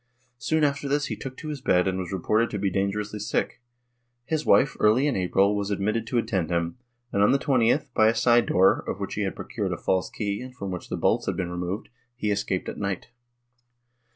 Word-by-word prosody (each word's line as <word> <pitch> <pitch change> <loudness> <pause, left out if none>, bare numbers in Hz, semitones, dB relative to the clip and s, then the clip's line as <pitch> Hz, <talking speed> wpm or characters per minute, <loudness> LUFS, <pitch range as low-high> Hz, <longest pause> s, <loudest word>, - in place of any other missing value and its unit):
Soon 155 +7 +1
after 140 -1 +1
this 145 +1 +1
he - - -3
took 130 -1 -8
to 155 - -7
his 145 -3 -5
bed 90 -6 +3
and 95 0 -1
was 90 -2 -5
reported 105 +5 +1
to 105 - -3
be 100 -1 0
dangerously 105 +2 -2
sick; 105 - -2 0.6
his 155 +1 -2
wife, 135 - +4
early 110 +6 +4
in 145 - +1
April, 95 +2 +2
was 100 -1 -2
admitted 105 +3 -1
to 125 - -1
attend 105 -8 0
him 85 +5 -1 0.3
and, 100 - +2
on 100 - +5
the 140 - +4
20th, 125 -4 +1
by 110 - +4
a 115 - +3
side 120 0 +4
door, 95 +1 +4
of - - -3
which - - -4
he - - -2
had - - -2
procured - - -4
a - - -4
false 95 -1 0
key 105 -1 -3
and 130 0 -9
from 100 -6 -5
which 90 - -6
the - - -2
bolts - - +1
had - - -1
been 90 -2 -2
removed, 90 +4 -4 0.3
he 105 -3 -1
escaped 100 -2 -1
at - - -5
night. 100 -2 -3
105 Hz, 225 wpm, -26 LUFS, 95-125 Hz, 0.6 s, on